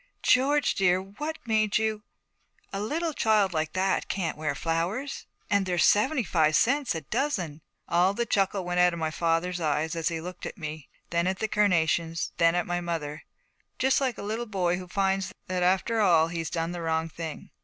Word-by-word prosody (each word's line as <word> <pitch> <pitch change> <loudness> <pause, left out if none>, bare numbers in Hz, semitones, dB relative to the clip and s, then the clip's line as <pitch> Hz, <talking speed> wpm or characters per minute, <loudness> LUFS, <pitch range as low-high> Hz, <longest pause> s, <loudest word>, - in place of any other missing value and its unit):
'George, 285 +3 +3
dear, 185 -2 +3
what 295 +12 -6
made 215 -2 +2
you? 220 -1 -1 0.7
A 195 - -2
little 320 +9 -1
child 215 -7 +2
like 155 -1 -1
that 190 0 0
can't 180 -5 -2
wear 155 -2 -2
flowers 175 - -2 0.2
and 200 -2 +1
they're 180 -1 0
seventy 250 - +3
five 160 -4 +2
cents 275 - +2
a 160 - -3
dozen!' 170 - -2 0.3
All 180 +3 +3
the 235 - 0
chuckle 195 -3 0
went 180 0 -1
out 180 0 +5
of - - -4
my 160 -1 -1
father's 170 +2 0
eyes: 155 +1 0
he 165 -1 -1
looked 180 +2 -7
at - - -9
me, 155 -3 -7 0.2
then 170 +1 +1
at 190 0 0
the 220 - -1
carnations, 170 -5 +1
then 165 0 +4
at 175 - +1
my 175 0 -2
mother, 155 -3 -4 0.6
just 265 +1 +2
like 260 -3 0
a - - -6
little 220 +3 -3
boy 180 -4 0
who 180 - -8
finds 195 0 0
that 185 -1 -2
after 190 +5 +2
all 165 -5 +4
he's 165 -2 -3
done 165 0 -2
the 175 -1 -5
wrong 160 0 0
thing. 160 -1 -7
180 Hz, 190 wpm, -27 LUFS, 165-210 Hz, 0.7 s, out